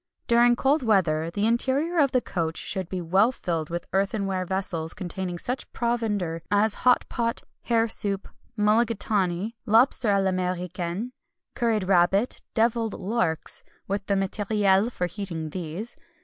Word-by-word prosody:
During 240 Hz, 0 st, +5 dB
cold 280 Hz, +5 st, +2 dB
weather 170 Hz, -9 st, +2 dB
the 200 Hz, +4 st, -1 dB
interior 270 Hz, +9 st, +1 dB
of 280 Hz, -3 st, +4 dB
the 255 Hz, -, +2 dB
coach 165 Hz, -6 st, -3 dB
should 190 Hz, -2 st, -3 dB
be 185 Hz, -1 st, -3 dB
well 190 Hz, +8 st, +3 dB
filled 165 Hz, -9 st, -3 dB
with 170 Hz, 0 st, -4 dB
earthenware 195 Hz, -1 st, 0 dB
vessels 175 Hz, -4 st, -2 dB
containing 180 Hz, 0 st, -4 dB
such 250 Hz, +9 st, -4 dB
provender 210 Hz, -9 st, -1 dB
as 210 Hz, +1 st, +4 dB
hot 250 Hz, -1 st, +4 dB
pot, 230 Hz, -1 st, -2 dB, 0.2 s
hare 230 Hz, -1 st, +2 dB
soup, 200 Hz, -3 st, -1 dB, 0.3 s
mullagatawny, 210 Hz, -3 st, +1 dB
lobster 230 Hz, +1 st, +4 dB
à 200 Hz, -1 st, +3 dB
l'Américaine, 180 Hz, +3 st, -2 dB, 0.4 s
curried 230 Hz, -5 st, +1 dB
rabbit, 190 Hz, +4 st, +2 dB
devilled 225 Hz, -1 st, +1 dB
larks 190 Hz, -6 st, 0 dB, 0.3 s
with 200 Hz, +1 st, -2 dB
the 200 Hz, -, +2 dB
matériel 200 Hz, +2 st, +1 dB
for 180 Hz, -, -2 dB
heating 170 Hz, -4 st, -5 dB
these. 180 Hz, +6 st, -5 dB
200 Hz, 135 wpm, -25 LUFS, 180-230 Hz, 0.4 s, During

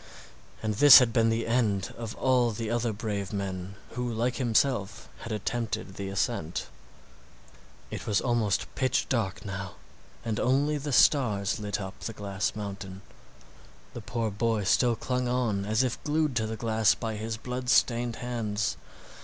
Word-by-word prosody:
And 110 Hz, -1 st, 0 dB
this 140 Hz, +6 st, +10 dB
had 125 Hz, -4 st, +4 dB
been 115 Hz, -1 st, +3 dB
the 115 Hz, 0 st, 0 dB
end 110 Hz, -5 st, 0 dB
of 115 Hz, -2 st, -6 dB
all 125 Hz, -2 st, +2 dB
the 115 Hz, 0 st, -4 dB
other 120 Hz, 0 st, 0 dB
brave 100 Hz, -2 st, -4 dB
men 95 Hz, -1 st, -4 dB, 0.2 s
who 125 Hz, 0 st, -3 dB
like 120 Hz, +2 st, -1 dB
himself 120 Hz, -4 st, 0 dB
had 115 Hz, -, -7 dB
attempted 110 Hz, -1 st, -3 dB
the 100 Hz, 0 st, -5 dB
ascent. 100 Hz, -4 st, -2 dB, 1.3 s
It -, -, -6 dB
was 105 Hz, -2 st, +2 dB
almost 115 Hz, -5 st, 0 dB
pitch 130 Hz, -1 st, 0 dB
dark 110 Hz, -5 st, -1 dB
now, 95 Hz, -1 st, -5 dB, 0.5 s
and 110 Hz, -2 st, -1 dB
only 145 Hz, +4 st, +2 dB
the 145 Hz, +1 st, -4 dB
stars 110 Hz, -7 st, +3 dB
lit 105 Hz, -1 st, -3 dB
up 95 Hz, 0 st, -7 dB
the 115 Hz, -, -5 dB
glass 100 Hz, -1 st, -3 dB
mountain. 100 Hz, -2 st, -7 dB, 0.9 s
The 120 Hz, -, -7 dB
poor 115 Hz, 0 st, -2 dB
boy 110 Hz, +1 st, 0 dB
still 120 Hz, +5 st, +3 dB
clung 125 Hz, +2 st, -2 dB
on 120 Hz, -6 st, 0 dB
as 110 Hz, +4 st, +2 dB
if 125 Hz, -2 st, -3 dB
glued 150 Hz, -2 st, 0 dB
to 110 Hz, -1 st, 0 dB
the 110 Hz, 0 st, -4 dB
glass 110 Hz, -1 st, +2 dB
by 110 Hz, -2 st, -4 dB
his 110 Hz, +1 st, -4 dB
blood 125 Hz, +2 st, -5 dB
stained 120 Hz, -1 st, +3 dB
hands. 110 Hz, -, -2 dB
110 Hz, 160 wpm, -28 LUFS, 100-125 Hz, 1.3 s, this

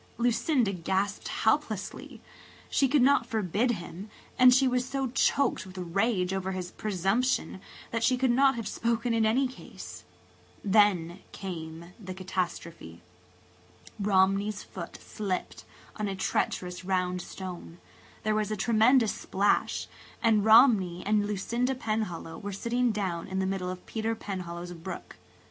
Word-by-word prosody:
Lucinda 235 Hz, -1 st, +2 dB
gasped 190 Hz, +3 st, -1 dB
helplessly. 220 Hz, -4 st, -1 dB, 0.5 s
She 275 Hz, -, +3 dB
could 275 Hz, 0 st, +3 dB
not 265 Hz, -3 st, +4 dB
forbid 220 Hz, +1 st, 0 dB
him 185 Hz, +1 st, -8 dB, 0.3 s
and 255 Hz, 0 st, +7 dB
she 260 Hz, +1 st, +5 dB
was 250 Hz, 0 st, +1 dB
so 265 Hz, -1 st, -2 dB
choked 270 Hz, +1 st, +2 dB
with 185 Hz, 0 st, -12 dB
rage 185 Hz, +1 st, 0 dB
over 190 Hz, 0 st, -2 dB
his 180 Hz, -1 st, -5 dB
presumption 200 Hz, +2 st, 0 dB, 0.3 s
that 230 Hz, -1 st, -1 dB
she 255 Hz, +1 st, +3 dB
could 255 Hz, -1 st, +2 dB
not 270 Hz, +2 st, +4 dB
have 230 Hz, -2 st, -4 dB
spoken 235 Hz, +1 st, 0 dB
in 225 Hz, -1 st, +3 dB
any 260 Hz, +5 st, +2 dB
case. 255 Hz, -, -10 dB, 0.6 s
Then 195 Hz, -4 st, +3 dB
came 170 Hz, -2 st, -7 dB
the 185 Hz, -3 st, -7 dB
catastrophe. 175 Hz, -, -4 dB, 1.0 s
Romney's 195 Hz, 0 st, +2 dB
foot 170 Hz, -3 st, -8 dB
slipped 195 Hz, -4 st, -4 dB, 0.3 s
on 210 Hz, -1 st, -2 dB
a 195 Hz, -, -3 dB
treacherous 180 Hz, -1 st, -2 dB
round 180 Hz, -1 st, 0 dB
stone–there 95 Hz, -, -7 dB
was 215 Hz, -1 st, 0 dB
a 215 Hz, -, -2 dB
tremendous 225 Hz, +3 st, +4 dB
splash–and 205 Hz, +2 st, 0 dB
Romney 215 Hz, -6 st, +5 dB
and 205 Hz, 0 st, +2 dB
Lucinda 235 Hz, +6 st, -1 dB
Penhallow 215 Hz, -9 st, -3 dB
were 205 Hz, -, -5 dB
sitting 235 Hz, +5 st, 0 dB
down 190 Hz, -5 st, -2 dB
in 190 Hz, -, -4 dB
the 190 Hz, -, +1 dB
middle 190 Hz, -1 st, -2 dB
of 180 Hz, 0 st, -7 dB
Peter 225 Hz, 0 st, -2 dB
Penhallow's 175 Hz, -4 st, -6 dB
brook. 175 Hz, +2 st, -8 dB
205 Hz, 135 wpm, -28 LUFS, 185-230 Hz, 1.0 s, and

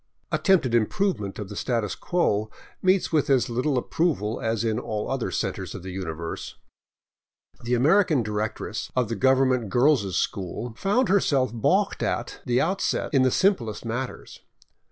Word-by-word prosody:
Attempted 165 Hz, -, +2 dB
improvement 115 Hz, -, 0 dB
of 105 Hz, -, -5 dB
the 105 Hz, -, -8 dB
status 115 Hz, -2 st, -1 dB
quo 110 Hz, -, 0 dB, 0.3 s
meets 185 Hz, 0 st, +2 dB
with 155 Hz, -4 st, +1 dB
as 135 Hz, -3 st, +4 dB
Httle 130 Hz, +3 st, -1 dB
ap 125 Hz, -, -4 dB
proval 135 Hz, -, 0 dB
as 115 Hz, -1 st, 0 dB
in 110 Hz, 0 st, 0 dB
all 110 Hz, -2 st, -4 dB
other 135 Hz, -3 st, -1 dB
centers -, -, -3 dB
of -, -, -8 dB
the 95 Hz, -, -6 dB
universe. 85 Hz, -3 st, -5 dB, 1.1 s
The 120 Hz, +1 st, 0 dB
American 155 Hz, -, +3 dB
directress 110 Hz, 0 st, -3 dB
of 125 Hz, -4 st, +1 dB
the 115 Hz, -, -2 dB
government 130 Hz, -1 st, +2 dB
girls' 120 Hz, -, +2 dB
school 100 Hz, +5 st, -3 dB
found 205 Hz, -, +1 dB
herself 140 Hz, -10 st, +2 dB
balked 115 Hz, -, +1 dB
at -, -, -2 dB
the 125 Hz, 0 st, +2 dB
outset 190 Hz, -1 st, -1 dB
in 135 Hz, -, +5 dB
the 130 Hz, -, +4 dB
simplest 125 Hz, -, +1 dB
matters. 125 Hz, +3 st, -5 dB
125 Hz, 155 wpm, -25 LUFS, 110-150 Hz, 1.1 s, in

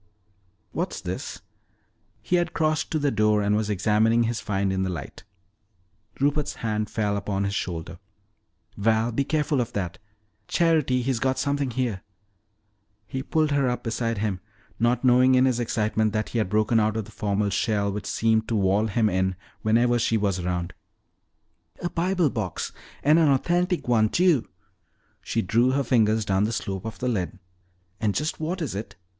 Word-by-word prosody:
"What's -, -, -3 dB
this?" -, -, -5 dB, 0.8 s
He 180 Hz, -, +2 dB
had 175 Hz, -, -1 dB
crossed 155 Hz, -1 st, 0 dB
to 160 Hz, -, 0 dB
the 145 Hz, -2 st, +1 dB
door 105 Hz, -2 st, +2 dB
and 105 Hz, +1 st, +2 dB
was 105 Hz, 0 st, 0 dB
examining 110 Hz, +4 st, +3 dB
his 115 Hz, 0 st, -1 dB
find 100 Hz, -1 st, -1 dB
in 95 Hz, -, -1 dB
the 95 Hz, -, 0 dB
light. 90 Hz, -, -7 dB, 1.0 s
Rupert's 145 Hz, +1 st, 0 dB
hand 110 Hz, -1 st, -1 dB
fell 105 Hz, -2 st, -1 dB
upon 100 Hz, -1 st, -2 dB
his 100 Hz, 0 st, -1 dB
shoulder. 85 Hz, -5 st, -4 dB, 0.8 s
"Val, 110 Hz, +3 st, +1 dB
be 140 Hz, +5 st, 0 dB
careful 150 Hz, -1 st, 0 dB
of 120 Hz, 0 st, -4 dB
that. 90 Hz, -4 st, -3 dB, 0.5 s
Charity, 155 Hz, -7 st, +2 dB
he's 130 Hz, -2 st, 0 dB
got 130 Hz, +1 st, 0 dB
something 140 Hz, 0 st, 0 dB
here!" 120 Hz, -6 st, -2 dB, 1.0 s
He 130 Hz, +5 st, -4 dB
pulled 155 Hz, +2 st, +1 dB
her 140 Hz, -3 st, +2 dB
up 125 Hz, -, -3 dB
beside 115 Hz, 0 st, -1 dB
him, 100 Hz, -3 st, -1 dB, 0.4 s
not 120 Hz, +2 st, +2 dB
noting 130 Hz, +1 st, +5 dB
in 130 Hz, +1 st, +5 dB
his 125 Hz, -2 st, +1 dB
excitement 110 Hz, -2 st, 0 dB
that 110 Hz, -1 st, -1 dB
he 120 Hz, -, -1 dB
had 105 Hz, -, 0 dB
broken 110 Hz, +2 st, +2 dB
out 110 Hz, 0 st, +1 dB
of 110 Hz, -, -2 dB
the 110 Hz, -, -14 dB
formal 105 Hz, -1 st, -1 dB
shell 100 Hz, 0 st, 0 dB
which 105 Hz, +1 st, -5 dB
seemed 110 Hz, -1 st, +1 dB
to 115 Hz, -, -1 dB
wall 100 Hz, +2 st, +2 dB
him 110 Hz, +1 st, +1 dB
in 95 Hz, -1 st, 0 dB, 0.3 s
whenever 120 Hz, +2 st, +3 dB
she 115 Hz, -1 st, +2 dB
was 100 Hz, -3 st, 0 dB
around. 90 Hz, 0 st, -2 dB, 1.1 s
"A 175 Hz, -, -3 dB
Bible 175 Hz, -3 st, +1 dB
box! 100 Hz, -7 st, -3 dB, 0.3 s
And 150 Hz, +4 st, +5 dB
an 160 Hz, -3 st, +4 dB
authentic 175 Hz, +6 st, +1 dB
one, 110 Hz, -3 st, +3 dB
too!" 170 Hz, -, +3 dB, 0.7 s
She 115 Hz, -, -1 dB
drew 120 Hz, +7 st, +2 dB
her 140 Hz, +1 st, +1 dB
fingers 110 Hz, -3 st, +2 dB
down 95 Hz, 0 st, +2 dB
the 110 Hz, -, -1 dB
slope 95 Hz, -3 st, -4 dB
of 110 Hz, -, -5 dB
the 125 Hz, -, -3 dB
lid. 95 Hz, -9 st, -2 dB, 0.6 s
"And 105 Hz, -3 st, 0 dB
just 150 Hz, +2 st, -2 dB
what 170 Hz, +3 st, -2 dB
is 135 Hz, -, -3 dB
it?" 100 Hz, +1 st, -6 dB
115 Hz, 175 wpm, -25 LUFS, 105-130 Hz, 1.1 s, noting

